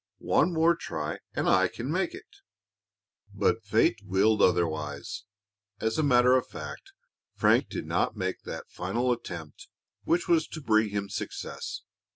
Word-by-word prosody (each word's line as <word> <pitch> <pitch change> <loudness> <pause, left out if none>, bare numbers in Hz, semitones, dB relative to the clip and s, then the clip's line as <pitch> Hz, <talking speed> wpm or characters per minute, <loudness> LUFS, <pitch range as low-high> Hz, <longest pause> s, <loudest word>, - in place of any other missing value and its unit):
One 170 - +2
more 165 +1 +4
try 75 - -4 0.2
and - - 0
I 95 0 +5
can 120 +9 -5
make 190 - 0
it." 370 - -11 1.1
But 105 +3 +1
Fate 110 +2 +2
willed 100 +3 +2
otherwise. 80 -1 0 0.5
As 110 +5 -1
a - - +4
matter 125 -3 +5
of 130 - +1
fact, 390 - -9 0.4
Frank - - +3
did - - -4
not - - 0
make - - -2
that - - -8
final 125 +1 0
effort 85 -9 -9 0.4
which 175 +1 +1
was 165 -2 +3
to 160 - -7
bring 110 -6 +2
him 100 0 -2
success. 100 - -5
110 Hz, 150 wpm, -28 LUFS, 95-155 Hz, 1.1 s, I